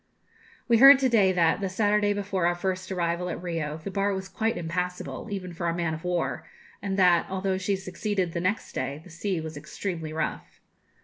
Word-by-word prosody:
We 230 -1 +4
heard 275 +2 +10
to 265 -1 +2
day 205 -5 +4
that, 170 0 +2
the 195 - -1
Saturday 205 +1 +2
before 200 -3 0
our 175 - +1
first 185 +1 -3
arrival 175 0 -1
at - - -4
Rio, 165 -4 -3
the 160 +5 -7
bar 200 +1 0
was 190 0 -5
quite 225 +3 -1
impassable, 180 +5 -4
even 185 -3 -5
for 170 0 -3
a 165 - 0
man 170 -2 -1
of 160 +2 -7
war, 180 -1 -2 0.3
and 195 -1 -2
that, 180 -3 +4
although 190 0 -1
she 195 +1 0
succeeded 190 0 -2
the 170 - -3
next 190 +5 -1
day, 140 +2 -3
the 180 - -14
sea 185 +1 -2
was 160 -1 -6
extremely 160 +2 -5
rough. 160 - -4
185 Hz, 200 wpm, -27 LUFS, 170-200 Hz, 0.3 s, heard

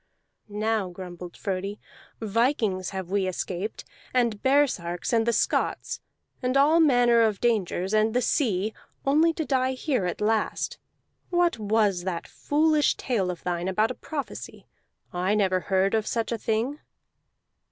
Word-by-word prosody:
"Now," 215 -1 -1
grumbled 180 -1 -9
Frodi, 195 +1 -3 0.4
"vikings 220 -4 0
have 190 -2 -6
we 195 -1 +1
escaped, 185 +2 -4 0.3
and 235 -4 +1
baresarks, 250 -11 +1
and 225 0 +2
the - - +4
Scots, - - 0 0.4
and 255 +1 +1
all 300 +4 +5
manner 245 -6 +5
of 215 -3 +2
dangers, 200 -4 0
and 215 +1 +2
the 250 - +3
sea, 215 - +1 0.3
only 310 +4 +4
to 320 -1 -3
die 260 -2 +1
here 255 - -1
at 175 - -4
last. 215 +1 0 0.5
What 350 -8 +2
was 205 -4 +1
that 175 -2 -3
foolish 305 0 +2
tale 210 -8 -1
of 175 -2 -5
thine 175 0 -2
about 215 +5 +1
a - - -3
prophecy? 290 +1 -7 0.5
I 185 +4 +1
never 190 -3 +2
heard 190 +2 +1
of 220 -1 +1
such 230 0 -1
a 235 - 0
thing." 230 +8 -1
220 Hz, 145 wpm, -26 LUFS, 190-255 Hz, 0.5 s, all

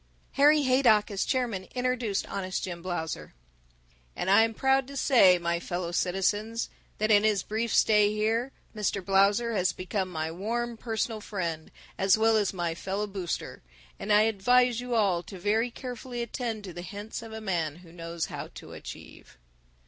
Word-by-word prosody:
Harry 295 +1 +5
Haydock, 255 -6 +4
as 195 - -1
chairman, 240 -8 -1
introduced 250 -5 -1
Honest 185 -2 -3
Jim 175 -2 -5
Blausser. 160 - -4 0.8
"And 190 - -1
I 200 +3 +7
am 225 0 +1
proud 265 +1 +2
to 280 0 -8
say, 200 -10 +6
my 170 0 -1
fellow 175 0 -4
citizens, 205 +6 0 0.3
that 215 +1 +1
in 205 -1 +6
his 210 -3 +2
brief 225 +2 -2
stay 210 -1 +4
here 225 +4 0 0.2
Mr. 200 -3 -1
Blausser 200 +5 +3
has 185 -3 +1
become 185 +1 -3
my 160 -2 -3
warm 235 +7 -3
personal 225 -1 -3
friend 170 -7 -4 0.3
as 190 +1 +4
well 225 0 +4
as 210 -3 +2
my 175 -3 -2
fellow 195 +5 -3
booster, 195 -4 -5 0.4
and 210 - -3
I 210 +1 +6
advise 245 +3 +3
you 245 -1 -3
all 195 -6 +2
to 190 +2 -10
very 215 +6 +1
carefully 245 0 -6
attend 230 -2 -4
to 185 -3 -8
the 175 - -7
hints 205 +6 -7
of 225 -1 -10
a 220 - -6
man 170 -8 -2
who 165 - -15
knows 165 -1 -4
how - - -6
to - - -10
achieve." - - -11
210 Hz, 170 wpm, -28 LUFS, 185-230 Hz, 0.8 s, I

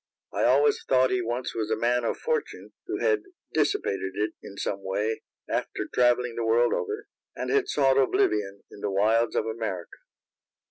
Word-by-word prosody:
I - - +1
always 445 0 +4
thought 130 0 +3
he 125 - +1
once 120 +2 -3
was 110 -2 -2
a 110 - +2
man 120 +2 +1
of - - -1
fortune, 470 -2 -3
who - - -2
had 445 -3 +3 0.3
dissipated 95 - 0
it 105 +1 -1
in 100 - -11
some 100 - -2
way, 105 +3 -1 0.3
after - - -2
travelling 125 -1 +3
the 115 - -3
world 115 +2 +3
over, 425 0 -3 0.3
and - - -3
had 420 -2 +2
sought 135 -2 +3
oblivion 105 -6 +1
in - - -12
the 105 - -2
wilds 110 +4 +2
of - - +1
America. 110 -6 -4
115 Hz, 175 wpm, -27 LUFS, 105-130 Hz, 0.3 s, always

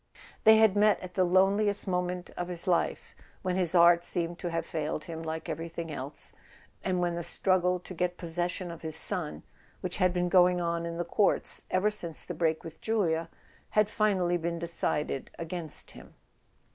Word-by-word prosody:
They 220 0 +8
had 220 -3 +5
met 210 0 +4
at 185 0 -8
the 185 - +2
loneliest 195 +3 +2
moment 180 -1 -2
of 175 - -5
his 175 -1 -5
life, 180 -3 0 0.3
when 185 -1 -1
his 185 -2 +2
art 170 0 +6
seemed 170 0 -2
to 175 - -3
have 165 0 -2
failed 155 -1 -3
him 165 -1 -7
like 160 +1 -5
everything 165 0 -5
else, 140 0 -2 0.5
and 185 -1 0
when 175 -1 0
the 170 - -3
struggle 180 +1 +1
to 185 - -9
get 180 0 -2
possession 175 +1 -3
of 170 - -10
his 160 -1 -1
son, 170 -1 +2 0.4
which 180 -1 -3
had 185 -2 +3
been 180 0 0
going 180 0 +4
on 170 -1 -1
in 170 0 -5
the 175 - -2
courts 205 +4 +2
ever 195 +3 +2
since 170 -6 0
the 180 - -6
break 160 -1 0
with 160 -1 -10
Julia, 170 -7 0 0.4
had 210 -1 +2
finally 190 -5 +1
been 170 0 -3
decided 160 -4 -2
against 165 -1 -5
him. - - -14
175 Hz, 185 wpm, -29 LUFS, 165-185 Hz, 0.5 s, They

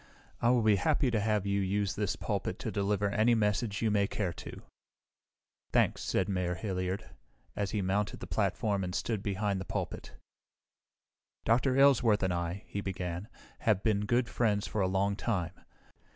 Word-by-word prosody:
"I 120 - +4
will 120 -2 +4
be 105 -2 +5
happy 125 - +2
to 110 - +1
have 105 -1 +1
you 100 0 +1
use 100 +1 0
this 105 -2 -1
pulpit - - -2
to - - -4
deliver 100 0 0
any 115 +3 +3
message 105 0 0
you 110 - +2
may 100 -1 +2
care 95 -5 -2
to." - - -9 1.1
"Thanks," - - +2
said - - 0
Mayor 90 -3 -1
Hilliard 95 +2 -3 0.5
as 100 -1 -1
he 105 -1 -1
mounted 100 +2 -1
the - - -6
platform 100 -3 0
and 90 0 -3
stood 110 -4 -1
behind 100 -1 -1
the - - -3
pulpit. - - -5 1.3
"Dr. 130 +3 +3
Aylesworth 125 -7 +5
and 95 -1 +1
I," 85 +2 -3
he 100 - -4
began, 90 -1 -4 0.3
"have 105 -4 +1
been 105 -2 +1
good 120 +1 +2
friends 105 -3 +1
for 110 - -2
a 95 - +2
long 100 +2 +1
time. 95 -6 -1
100 Hz, 170 wpm, -31 LUFS, 95-110 Hz, 1.3 s, be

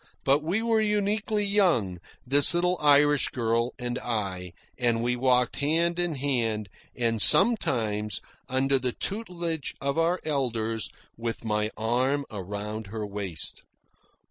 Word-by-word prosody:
But 140 +2 +3
we 185 +9 -1
were 225 -1 +2
uniquely 210 0 0
young, 170 - +1 0.3
this 140 +6 +7
little 180 +1 +2
Irish 145 -1 +4
girl 115 0 -1
and 125 0 -4
I, 95 -6 -4 0.3
and 120 -2 +1
we 125 +1 0
walked 125 -1 +1
hand 165 +4 +1
in 175 -3 -1
hand, 115 -7 -1 0.3
and, 115 -3 0
sometimes, 110 - +3 0.3
under 135 +1 +1
the 125 -1 -2
tutelage 175 -7 -4
of 140 +3 -1
our 170 +2 +1
elders, 115 -7 -1 0.3
with 115 0 -5
my 105 -1 0
arm 130 +6 0
around 105 +2 -6
her 105 +1 -5
waist. 100 -5 -6
125 Hz, 130 wpm, -26 LUFS, 110-165 Hz, 0.3 s, this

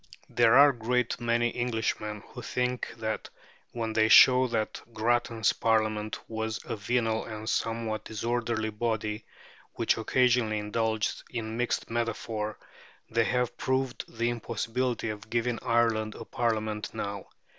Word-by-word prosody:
There 115 - +4
are 145 +1 +9
a - - -11
great 120 +1 0
many 120 0 +1
Englishmen 110 -3 -2
who 125 - -9
think 125 +1 -2
that 110 -1 -3 0.4
when 115 -2 -3
they 110 0 +3
show 130 +2 +8
that 115 -3 -2
Grattan's 115 0 +1
Parliament 110 -1 +1
was 110 0 -3
a - - -3
venal 110 +1 0
and 110 0 -7
somewhat 115 -1 -1
disorderly 115 0 -1
body, 110 -1 -2 0.5
which - - +1
occasionally 120 -2 +2
indulged 110 +1 -1
in 110 -2 -4
mixed 120 -1 -1
metaphor, 115 -2 -2 0.5
they 115 0 +3
have 125 0 0
proved 130 -1 -1
the 120 +1 +1
impossibility 120 +1 -2
of 105 +1 -9
giving 120 0 0
Ireland 115 -2 +1
a - - -8
Parliament 110 -2 -2
now. 100 -1 -4
115 Hz, 135 wpm, -28 LUFS, 110-120 Hz, 0.5 s, are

